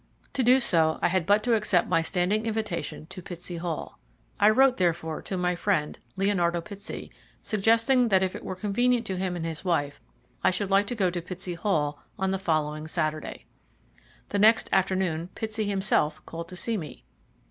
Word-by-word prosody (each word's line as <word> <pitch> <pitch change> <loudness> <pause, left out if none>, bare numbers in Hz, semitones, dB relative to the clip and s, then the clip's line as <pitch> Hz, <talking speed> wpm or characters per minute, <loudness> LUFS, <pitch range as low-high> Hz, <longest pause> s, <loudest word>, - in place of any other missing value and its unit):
To 265 - 0
do 255 +2 +5
so 160 -9 +3
I - - +4
had 180 -2 0
but 205 +1 +4
to 245 - +2
accept 210 -5 +2
my 165 - +2
standing 195 +6 0
invitation 215 -9 -3
to 185 - -8
Pitsey 175 0 -7
Hall. 165 -2 -5 0.4
I 210 +1 +6
wrote, 260 +3 +4
therefore, 170 -3 0
to 190 - -4
my 180 0 0
friend, 170 -4 -1 0.2
Leonardo 180 -3 +1
Pitsey, 200 +4 -8 0.3
suggesting 230 +4 +3
that 190 -3 +3
if 185 - -1
it - - -7
were 185 - -4
convenient 230 +5 +1
to 190 -3 -3
him 185 -1 -2
and 165 -2 -4
his 160 0 -5
wife 145 -6 -1 0.4
I - - +5
should 195 +1 -2
like 200 +1 +4
to 245 - -3
go 190 -5 +1
to 175 0 -3
Pitsey 180 +1 -5
Hall 150 -6 -1 0.2
on 190 0 0
the 190 - -1
following 155 -3 -1
Saturday. 155 -1 -3 0.8
The 205 - -1
next 220 +2 +5
afternoon 185 -3 +1
Pitsey 220 -1 -3
himself 190 -6 0
called 165 0 -7
to 185 - -8
see 225 +5 -1
me. 155 -6 -8
185 Hz, 185 wpm, -27 LUFS, 170-210 Hz, 0.8 s, I